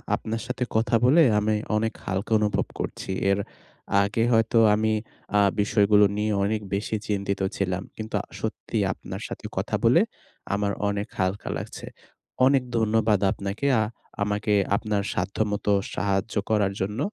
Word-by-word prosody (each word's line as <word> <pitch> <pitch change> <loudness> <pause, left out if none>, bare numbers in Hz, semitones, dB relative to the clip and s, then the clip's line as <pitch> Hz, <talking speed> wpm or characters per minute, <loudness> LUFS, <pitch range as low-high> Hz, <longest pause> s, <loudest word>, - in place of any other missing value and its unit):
আপনার 115 +1 -4
সাথে 125 0 -2
কথা 115 +1 +2
বলে 150 +7 +6 0.2
আমি 105 +1 +1 0.2
অনেক 110 +1 0
হালকা 95 +4 -3
অনুভব 105 -1 +1
করছি। - - -4 0.2
এর 100 - +2 0.6
আগে 110 +3 0
হয়তো 115 +1 +3 0.2
আমি 110 +1 +1 0.5
আ - - +5 0.2
বিষয়গুলো 105 0 +4
নিয়ে 105 +1 0
অনেক 105 +1 0
বেশি 105 +2 -1
চিন্তিত 100 -1 -1 0.2
ছিলাম। 95 0 -1
কিন্তু 110 0 -5 0.2
সত্যি - - -4 0.2
আপনার - - -8
সাথে - - -8
কথা - - -1
বলে - - +6 0.5
আমার 100 0 0 0.2
অনেক 100 0 -2
হালকা 95 +2 -1
লাগছে। - - -7 0.6
অনেক 135 -1 +4
ধন্যবাদ 110 -2 +2
আপনাকে। 100 +9 -3
আ - - +3 0.4
আমাকে 105 0 0 0.2
আপনার 105 -1 -1
সাধ্যমত 105 +1 -2 0.3
সাহায্য 100 +3 -1 0.2
করার 105 -3 +2
জন্য। 105 +3 -2
105 Hz, 140 wpm, -25 LUFS, 100-110 Hz, 0.6 s, বলে